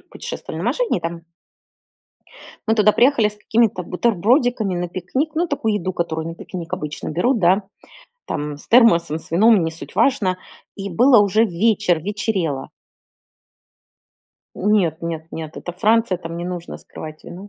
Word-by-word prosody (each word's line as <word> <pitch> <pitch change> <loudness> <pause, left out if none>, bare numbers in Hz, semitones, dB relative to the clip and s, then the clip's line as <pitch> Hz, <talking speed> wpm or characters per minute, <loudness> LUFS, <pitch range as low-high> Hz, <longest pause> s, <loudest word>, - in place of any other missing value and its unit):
путешествовали - - -7
на - - -3
машине, - - 0
и - - -13
там 170 0 -5 1.4
мы 220 - +3
туда 210 -1 +4
приехали 245 -4 +4
с 210 - -10
какими-то 220 -3 +1
бутербродиками 225 - +1
на 175 0 -2
пикник, 255 - -3
ну, 345 +2 +1
такую 225 -8 -1
еду, 185 -2 -2
которую 160 -2 -3
на 165 - -6
пикник 170 -1 -8
обычно 150 0 -4
берут, 230 - +1
да, 190 +2 +3 0.6
там, 145 0 -4
с - - -13
термосом, 170 -10 +4
с - - -12
вином, 210 +2 +5
не 160 - -2
суть 165 - -10
важно. 210 -6 +2 0.4
И 200 0 -5
было 240 +6 +5
уже 210 +3 +3
вечер, 195 -2 +1
вечерело. 190 -7 -2 1.9
Нет 185 -6 +1
нет 165 -1 -4
нет, 160 -1 -7
это 175 - -6
Франция, 215 +1 +2
там 165 -1 -7
не 175 - -4
нужно 175 -1 -6
скрывать 155 0 -10
вино 185 +4 -10
185 Hz, 155 wpm, -20 LUFS, 170-225 Hz, 1.9 s, вином